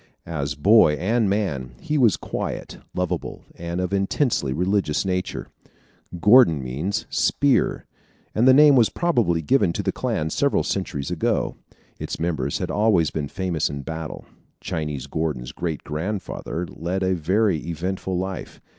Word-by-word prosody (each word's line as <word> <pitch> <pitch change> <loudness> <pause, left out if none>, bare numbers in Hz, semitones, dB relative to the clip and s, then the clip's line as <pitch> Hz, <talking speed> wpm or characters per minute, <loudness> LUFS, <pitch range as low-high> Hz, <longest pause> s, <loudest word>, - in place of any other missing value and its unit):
As 70 -3 -3
boy 95 +1 +5
and 105 +6 +1
man, 75 - -2
he 150 - -3
was 120 -8 +4
quiet, - - -5 0.2
lovable, 90 -1 -3
and 85 +1 -5
of 90 +1 -2
intensely 100 - +1
religious 90 +2 0
nature. 90 0 -2 0.7
Gordon 105 - +6
means 80 - -2
a - - -19
"spear," 140 -2 +2 0.5
and 115 +4 +3
the - - +9
name 145 0 +7
was 120 -4 +5
probably 115 - +1
given 100 - +3
to - - -3
the - - 0
clan 80 +1 -2
several 140 - +1
centuries 80 -6 -3
ago. 85 - 0 0.4
Its - - -5
members 80 -3 -1
had - - -3
always 100 -7 +3
been 75 -2 -3
famous 90 -2 -1
in 70 -1 -5
battle. 80 +1 -6 0.3
Chinese 75 -4 -4
Gordon's 70 -4 -3
great 80 -4 -4
grandfather 90 +1 -4
led 90 +4 -3
a 95 0 +2
very 95 +3 +1
eventful 90 +3 -3
life. 95 0 -5
90 Hz, 145 wpm, -23 LUFS, 80-105 Hz, 0.7 s, the